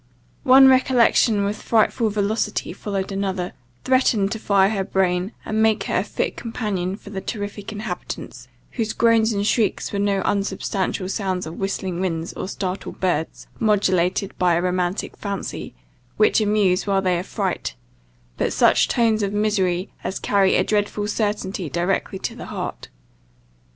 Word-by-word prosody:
One 265 Hz, +1 st, +8 dB
recollection 245 Hz, -5 st, +4 dB
with 205 Hz, +1 st, -3 dB
frightful 225 Hz, 0 st, +2 dB
velocity 210 Hz, +1 st, -1 dB
following 195 Hz, -1 st, -4 dB
another, 190 Hz, -2 st, -2 dB, 0.3 s
threatened 245 Hz, -6 st, +2 dB
to 220 Hz, -, -3 dB
fire 200 Hz, -1 st, +3 dB
her 195 Hz, -3 st, -1 dB
brain, 185 Hz, 0 st, 0 dB
and 220 Hz, 0 st, 0 dB
make 220 Hz, -1 st, +3 dB
her -, -, -1 dB
a -, -, +1 dB
fit -, -, -3 dB
companion 200 Hz, -5 st, -3 dB
for 205 Hz, -1 st, -12 dB
the 195 Hz, -2 st, -4 dB
terrific 205 Hz, -1 st, -5 dB
inhabitants, 180 Hz, -, -6 dB, 0.2 s
whose 220 Hz, -3 st, -2 dB
groans 230 Hz, -1 st, +3 dB
and 200 Hz, -1 st, -1 dB
shrieks 215 Hz, -1 st, 0 dB
were 200 Hz, -, -1 dB
no 200 Hz, -1 st, +1 dB
unsubstantial 195 Hz, -1 st, -1 dB
sounds 190 Hz, -2 st, -2 dB
of 160 Hz, +1 st, -8 dB
whistling 190 Hz, -2 st, -2 dB
winds, 170 Hz, -3 st, -2 dB
or -, -, -5 dB
startled 190 Hz, -1 st, -5 dB
birds, 175 Hz, -4 st, -1 dB
modulated 190 Hz, -3 st, +1 dB
by 180 Hz, -2 st, +3 dB
a 170 Hz, -, +1 dB
romantic 180 Hz, +1 st, -1 dB
fancy, 200 Hz, -, -5 dB, 0.4 s
which -, -, +4 dB
amuse 205 Hz, -3 st, +2 dB
while 195 Hz, -1 st, +2 dB
they 180 Hz, -2 st, +2 dB
affright; 115 Hz, -, -3 dB, 0.6 s
but -, -, 0 dB
such -, -, +4 dB
tones 225 Hz, -3 st, +2 dB
of 200 Hz, 0 st, -1 dB
misery 195 Hz, -3 st, 0 dB
as 190 Hz, -, -3 dB
carry 195 Hz, -2 st, +2 dB
a -, -, +3 dB
dreadful 205 Hz, 0 st, -1 dB
certainty 205 Hz, -5 st, -2 dB
directly 180 Hz, +5 st, -1 dB
to -, -, -4 dB
the -, -, -8 dB
heart. -, -, -5 dB
200 Hz, 150 wpm, -22 LUFS, 185-215 Hz, 0.6 s, One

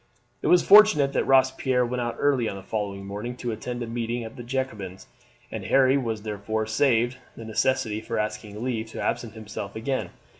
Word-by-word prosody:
It -, -, -1 dB
was 175 Hz, +2 st, +5 dB
fortunate 200 Hz, -9 st, +7 dB
that -, -, +1 dB
Robespierre 130 Hz, -1 st, +3 dB
went 125 Hz, +1 st, -2 dB
out 120 Hz, -1 st, -2 dB
early 135 Hz, -6 st, +2 dB
on -, -, -5 dB
the 95 Hz, -, -9 dB
following 100 Hz, -1 st, -4 dB
morning 105 Hz, +5 st, -5 dB
to 120 Hz, -, -3 dB
attend 120 Hz, +2 st, -4 dB
a -, -, -3 dB
meeting 115 Hz, +1 st, -3 dB
at 110 Hz, 0 st, -9 dB
the -, -, -8 dB
Jacobins, 115 Hz, -7 st, -4 dB, 0.5 s
and -, -, -5 dB
Harry 135 Hz, 0 st, +4 dB
was 115 Hz, -6 st, -2 dB
therefore 110 Hz, +1 st, -2 dB
saved 120 Hz, +1 st, +2 dB, 0.2 s
the 115 Hz, -, -8 dB
necessity 110 Hz, -1 st, 0 dB
for 115 Hz, -, -4 dB
asking 105 Hz, 0 st, -4 dB
leave 115 Hz, -3 st, -2 dB
to 110 Hz, -, -8 dB
absent 115 Hz, -2 st, -2 dB
himself 105 Hz, -2 st, -7 dB
again. 130 Hz, +4 st, -2 dB
115 Hz, 190 wpm, -25 LUFS, 110-130 Hz, 0.5 s, fortunate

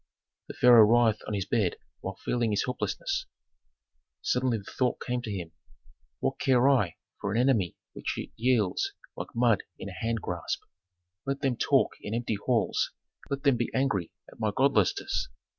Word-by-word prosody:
The -, -, -8 dB
pharaoh 120 Hz, -2 st, +8 dB
writhed 115 Hz, -1 st, +4 dB
on 105 Hz, -, -2 dB
his 95 Hz, -2 st, -1 dB
bed 100 Hz, -3 st, +1 dB, 0.2 s
while -, -, -5 dB
feeling 120 Hz, -2 st, +1 dB
his 105 Hz, -1 st, +1 dB
helplessness. 390 Hz, -, -2 dB, 1.0 s
Suddenly 130 Hz, -, +1 dB
the 100 Hz, -, -9 dB
thought 125 Hz, -1 st, +1 dB
came 125 Hz, 0 st, -2 dB
to 110 Hz, -, -5 dB
him: 90 Hz, -5 st, -5 dB, 0.7 s
"What -, -, -1 dB
care 130 Hz, -1 st, +4 dB
I 120 Hz, -11 st, +3 dB, 0.2 s
for 100 Hz, -, -2 dB
an 110 Hz, -, 0 dB
enemy 120 Hz, -9 st, +2 dB, 0.2 s
which -, -, -4 dB, 0.2 s
yields 115 Hz, -5 st, +1 dB, 0.2 s
like -, -, -7 dB
mud 115 Hz, -3 st, +3 dB, 0.2 s
in 100 Hz, -, -6 dB
a -, -, -8 dB
hand 115 Hz, +4 st, -1 dB
grasp? 90 Hz, -4 st, -3 dB, 0.6 s
Let 140 Hz, 0 st, -1 dB
them 135 Hz, -3 st, +1 dB
talk -, -, +3 dB
in 105 Hz, -, -4 dB
empty 115 Hz, -1 st, -1 dB
halls, 120 Hz, -4 st, +1 dB, 0.4 s
let 140 Hz, 0 st, -3 dB
them 140 Hz, -4 st, +4 dB
be 120 Hz, -, -1 dB
angry 100 Hz, -10 st, 0 dB, 0.2 s
at -, -, -16 dB
my 110 Hz, -1 st, +1 dB
godlessness. 130 Hz, -8 st, +2 dB
115 Hz, 165 wpm, -28 LUFS, 105-130 Hz, 1.0 s, pharaoh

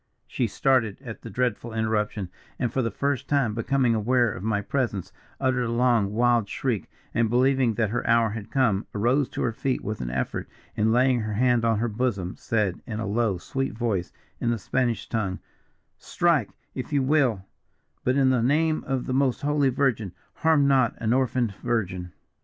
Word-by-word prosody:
She 120 Hz, -, -1 dB
started 115 Hz, -2 st, +1 dB
at 115 Hz, -4 st, -8 dB
the 115 Hz, -, -8 dB
dreadful 120 Hz, 0 st, -2 dB
interruption, 105 Hz, -3 st, -1 dB, 0.3 s
and, 120 Hz, -1 st, -1 dB
for 135 Hz, -, +1 dB
the 115 Hz, -, 0 dB
first 140 Hz, +4 st, -2 dB
time 140 Hz, -7 st, +2 dB
becoming 120 Hz, +2 st, +1 dB
aware 120 Hz, +1 st, +2 dB
of -, -, -8 dB
my 105 Hz, 0 st, 0 dB
presence, 105 Hz, -3 st, -2 dB, 0.3 s
uttered 130 Hz, -2 st, +1 dB
a 115 Hz, -, -2 dB
long 120 Hz, -4 st, +2 dB
wild 120 Hz, -1 st, +2 dB
shriek; 120 Hz, -7 st, -2 dB, 0.2 s
and, 115 Hz, 0 st, +2 dB
believing 130 Hz, -1 st, +3 dB
that 110 Hz, -2 st, 0 dB
her 120 Hz, -, -2 dB
hour 115 Hz, -1 st, +4 dB
had 105 Hz, -1 st, -6 dB
come, 110 Hz, -7 st, +1 dB
arose 125 Hz, +6 st, +2 dB
to -, -, -3 dB
her 120 Hz, -, +1 dB
feet 130 Hz, +3 st, -2 dB
with 105 Hz, +1 st, -4 dB
an -, -, -3 dB
effort, 65 Hz, +1 st, -3 dB, 0.3 s
and 110 Hz, +1 st, +2 dB
laying 125 Hz, +1 st, +3 dB
her 110 Hz, -1 st, -3 dB
hand 120 Hz, +1 st, +2 dB
on 115 Hz, -2 st, +2 dB
her 120 Hz, +3 st, 0 dB
bosom, 105 Hz, -5 st, -2 dB
said, 105 Hz, -6 st, -1 dB
in 110 Hz, -2 st, -4 dB
a 110 Hz, -, -2 dB
low, 105 Hz, -1 st, 0 dB
sweet 135 Hz, +9 st, -3 dB
voice, 105 Hz, -7 st, -1 dB, 0.3 s
in 120 Hz, -, 0 dB
the 120 Hz, -, +1 dB
Spanish 120 Hz, +1 st, -1 dB
tongue, 100 Hz, -5 st, -2 dB, 0.6 s
'Strike, 170 Hz, -4 st, +1 dB, 0.2 s
if 130 Hz, +1 st, -6 dB
you 140 Hz, -2 st, +2 dB
will; 130 Hz, -9 st, +2 dB, 0.6 s
but, 130 Hz, -, +2 dB
in 135 Hz, -2 st, +4 dB
the 125 Hz, -2 st, +2 dB
name 155 Hz, +5 st, +2 dB
of 135 Hz, -2 st, -1 dB
the 130 Hz, -, -2 dB
most 135 Hz, -1 st, +1 dB
Holy 145 Hz, -1 st, +2 dB
Virgin, 120 Hz, -8 st, 0 dB, 0.2 s
harm 155 Hz, -3 st, +3 dB
not 130 Hz, -4 st, +3 dB
an 115 Hz, 0 st, 0 dB
orphaned 125 Hz, -4 st, +1 dB
virgin!' 95 Hz, -7 st, -2 dB
120 Hz, 185 wpm, -25 LUFS, 110-130 Hz, 0.6 s, hour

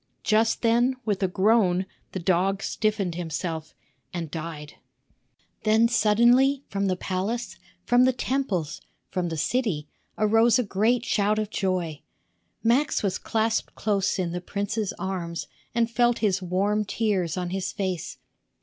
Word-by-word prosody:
Just 220 Hz, +2 st, +2 dB
then, 240 Hz, +3 st, +3 dB
with 205 Hz, -3 st, -1 dB
a 190 Hz, -, +3 dB
groan, 190 Hz, -1 st, +3 dB, 0.3 s
the -, -, -4 dB
dog 190 Hz, +3 st, +1 dB
stiffened 210 Hz, -5 st, -1 dB
himself 165 Hz, -1 st, -4 dB, 0.4 s
and 165 Hz, -4 st, -5 dB
died. 155 Hz, -2 st, -6 dB, 0.8 s
Then 220 Hz, +1 st, +4 dB
suddenly, 240 Hz, +5 st, +4 dB
from 200 Hz, 0 st, -1 dB
the 185 Hz, -, +1 dB
palace, 195 Hz, +6 st, -3 dB, 0.3 s
from 245 Hz, +1 st, +5 dB
the 260 Hz, -, +4 dB
temples, 225 Hz, -, -2 dB, 0.3 s
from 180 Hz, -2 st, -1 dB
the 160 Hz, -, -4 dB
city, 185 Hz, -, 0 dB, 0.3 s
arose 225 Hz, +2 st, +4 dB
a 250 Hz, -, +2 dB
great 220 Hz, +4 st, +1 dB
shout 210 Hz, 0 st, +1 dB
of 215 Hz, -1 st, -2 dB
joy. 180 Hz, -6 st, -1 dB, 0.6 s
Max 245 Hz, +5 st, +2 dB
was 190 Hz, -2 st, 0 dB
clasped 225 Hz, 0 st, -1 dB
close 200 Hz, -2 st, 0 dB
in 180 Hz, -3 st, -1 dB
the 175 Hz, +1 st, -4 dB
prince's 205 Hz, +2 st, -2 dB
arms 175 Hz, -3 st, -4 dB, 0.3 s
and 235 Hz, -1 st, +3 dB
felt 240 Hz, 0 st, +2 dB
his 195 Hz, -3 st, +1 dB
warm 195 Hz, +4 st, +1 dB
tears 200 Hz, -5 st, -1 dB
on 180 Hz, -1 st, -3 dB
his 190 Hz, 0 st, -2 dB
face. 185 Hz, -4 st, -3 dB
200 Hz, 140 wpm, -26 LUFS, 180-230 Hz, 0.8 s, from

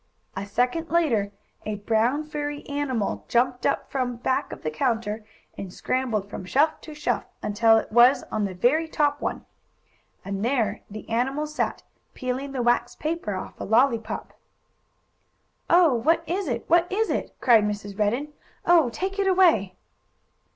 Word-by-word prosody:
A 195 Hz, +1 st, -4 dB
second 250 Hz, +10 st, 0 dB
later 245 Hz, -12 st, +1 dB, 0.3 s
a 215 Hz, 0 st, -3 dB
brown, 225 Hz, +7 st, +1 dB
furry 295 Hz, -1 st, -5 dB
animal 275 Hz, -7 st, -2 dB
jumped 245 Hz, +1 st, +1 dB
up 280 Hz, -, -1 dB
from 250 Hz, -3 st, -1 dB
back 250 Hz, +2 st, -1 dB
of -, -, -9 dB
the 155 Hz, -, -2 dB
counter, 225 Hz, -, -1 dB, 0.4 s
and 190 Hz, -2 st, -6 dB
scrambled 230 Hz, -3 st, -1 dB
from 200 Hz, -, -7 dB
shelf 290 Hz, +11 st, +1 dB
to 310 Hz, -, -10 dB
shelf, 300 Hz, -, -1 dB, 0.2 s
until 225 Hz, +2 st, +4 dB
it -, -, -3 dB
was 240 Hz, +4 st, +6 dB
on 215 Hz, -, -1 dB
the 190 Hz, -2 st, -5 dB
very 285 Hz, -, +2 dB
top 290 Hz, -2 st, 0 dB
one. -, -, -3 dB, 0.8 s
And 195 Hz, 0 st, -3 dB
there 230 Hz, -4 st, 0 dB
the 215 Hz, +1 st, -9 dB
animal 265 Hz, +6 st, 0 dB
sat, 305 Hz, 0 st, -3 dB, 0.3 s
peeling 260 Hz, +2 st, -3 dB
the 260 Hz, -3 st, -2 dB
wax 240 Hz, 0 st, +1 dB
paper 310 Hz, -, -3 dB
off 185 Hz, -, -7 dB
a -, -, -2 dB
lollypop. 225 Hz, 0 st, +1 dB, 1.4 s
"Oh, 340 Hz, -4 st, +6 dB
what 320 Hz, +8 st, +2 dB
is 375 Hz, +1 st, -2 dB
it? 235 Hz, -3 st, -3 dB
What 345 Hz, +1 st, +3 dB
is 440 Hz, +3 st, +1 dB
it?" -, -, -3 dB
cried 230 Hz, -4 st, +5 dB
Mrs. 205 Hz, -1 st, -4 dB
Redden. 245 Hz, +9 st, 0 dB, 0.3 s
"Oh, 335 Hz, -7 st, +5 dB
take 380 Hz, -, -4 dB
it 395 Hz, -, +2 dB
away!" 335 Hz, -, +4 dB
250 Hz, 160 wpm, -25 LUFS, 215-300 Hz, 1.4 s, was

